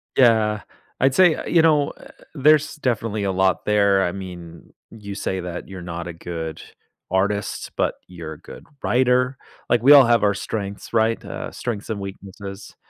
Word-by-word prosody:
Yeah, 110 -4 +4 0.4
I'd 135 +1 +3
say 180 -4 +6
eh, - - -6
you 170 - +4
know, 150 -3 +3
uh, - - -15 0.3
there's 150 +1 +4
definitely 115 -7 -1
a 95 - 0
lot 95 0 +1
there, 100 -2 +3
I 90 - 0
mean, 90 -3 -10 0.2
you 100 -3 -9
say 95 -1 -2
that 90 -1 -6
you're 95 -2 -8
not 85 0 -6
a 85 - -6
good 80 -1 -6 0.5
artist, 100 +2 -1
but - - 0
you're 85 -3 -8
a - - -13
good - - -12 0.2
writer, 125 +1 +2 0.3
like, 120 -1 +2
we 140 - +7
all 140 -3 +9
have 115 -2 +3
our 100 -1 +3
strengths, 100 +1 -5
right? 115 0 +2
Uh, - - -6
strengths 115 -3 -5
and 105 -2 -3
weaknesses, 100 0 -9
100 Hz, 175 wpm, -22 LUFS, 95-120 Hz, 0.5 s, all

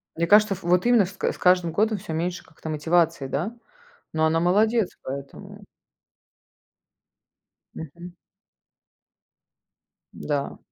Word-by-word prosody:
Мне 170 +1 -1
кажется, 210 0 +5
ф 190 - -9
вот 180 +4 +2
именно 240 -5 +5
с 190 - -9
к - - -1
с - - -13
каждым 180 -2 +3
годом 215 +4 +1
всё 180 -4 -7
меньше 175 +3 -3
как-то 160 0 -10
мотивации, 160 -1 +1
да? 175 - -3 0.6
Но 160 0 +1
она 160 +1 +2
молодец 210 +4 +2
поэтому. 140 +1 -8 2.1
Мгм. 170 +3 -9 2.0
Да. 145 -2 -3
175 Hz, 120 wpm, -24 LUFS, 160-195 Hz, 2.1 s, кажется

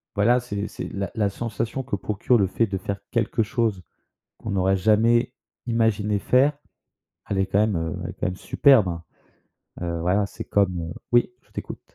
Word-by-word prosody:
voilà, 120 +5 +4
c'est 105 -4 -4
c'est - - -6
la 100 0 -3
la 105 -2 +1
sensation 115 +4 -3
que 125 -5 -2
procure 105 +5 +1
le 100 - +2
fait 115 +5 +1
de 95 -1 -3
faire 100 +1 -4
quelque 115 -1 +1
chose, 110 -4 -1 0.6
qu'on 110 - -6
n'aurait 95 0 +2
jamais 115 +5 +3 0.3
imaginé 110 -3 +1
faire, 135 +7 +3 0.8
elle 100 - -1
est 95 - +2
quand 100 - +1
même, 105 -3 +2
heu, 80 -1 -2
elle - - -4
est - - -10
quand - - -2
même 90 0 -3
superbe, 130 -7 +4
hein. 85 -1 -4 0.8
Heu, 85 -1 -2
voilà, 95 +4 +2
c'est - - -7
comme, 95 -3 +1
heu 80 0 -5 0.2
oui 120 0 +4
je - - -31
t'écoute. - - -7
105 Hz, 190 wpm, -24 LUFS, 95-115 Hz, 0.8 s, voilà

